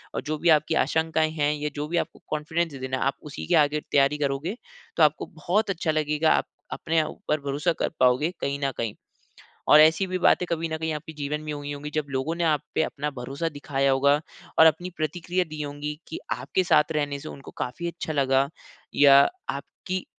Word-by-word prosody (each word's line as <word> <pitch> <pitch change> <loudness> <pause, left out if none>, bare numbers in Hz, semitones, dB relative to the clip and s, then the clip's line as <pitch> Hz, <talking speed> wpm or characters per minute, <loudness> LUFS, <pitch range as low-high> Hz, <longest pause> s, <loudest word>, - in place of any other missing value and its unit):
और - - -1
जो 155 0 -1
भी 170 +2 +1
आपकी 155 +1 -1
आशंकाएँ 160 0 +1
हैं 150 -1 +1
या 150 0 -2
जो 150 0 -3
भी 170 - -1
आपको - - -3
कॉन्फिडेंस 160 +2 -1
देना 130 0 -2
है, - - -1
आप 135 - +1
उसी 150 - -7
के 175 - +3
आगे 150 -1 +3
तैयारी 140 +1 +3
करोगे, 145 +6 -2 0.4
तो 160 - +5
आपको 150 0 +3
बहुत 180 +7 -1
अच्छा 165 -3 -1
लगेगा, 155 0 +1
आप - - +1 0.3
अपने 160 0 0
ऊपर 155 0 -3
भरोसा 145 +5 0
कर - - +1
पाओगे 130 +6 +3
कहीं 140 0 -2
न 135 - 0
कहीं। 115 -3 -3 0.7
और 150 - +9
ऐसी 160 +5 +5
भी 185 0 -2
बातें 180 0 +3
कभी 165 0 -1
न 160 - -2
कहीं 160 0 -2
आपके 150 +1 -7
जीवन 150 0 -3
में 155 0 -4
हुई 145 0 -5
होंगी 145 +1 -6
जब 155 -2 -1
लोगों 135 +4 -1
ने 170 - 0
आप 155 -3 +2
पे - - +2
अपना 150 -1 -3
भरोसा 135 +7 -3
दिखाया 140 -2 -1
होगा 140 +2 +3 0.4
और 160 - +9
अपनी 160 +3 +2
प्रतिक्रिया 175 +3 -1
दी 155 0 -7
होगी 145 +1 -5
कि - - -5
आपके 185 - -1
साथ 160 -3 +3
रहने 145 -2 -1
से 155 - -8
उनको 135 - -10
काफ़ी 170 +8 -4
अच्छा 170 -2 -5
लगा। 135 -1 +2 0.5
या 140 -1 +7 0.3
आपकी 185 0 -5
150 Hz, 210 wpm, -25 LUFS, 145-160 Hz, 0.7 s, और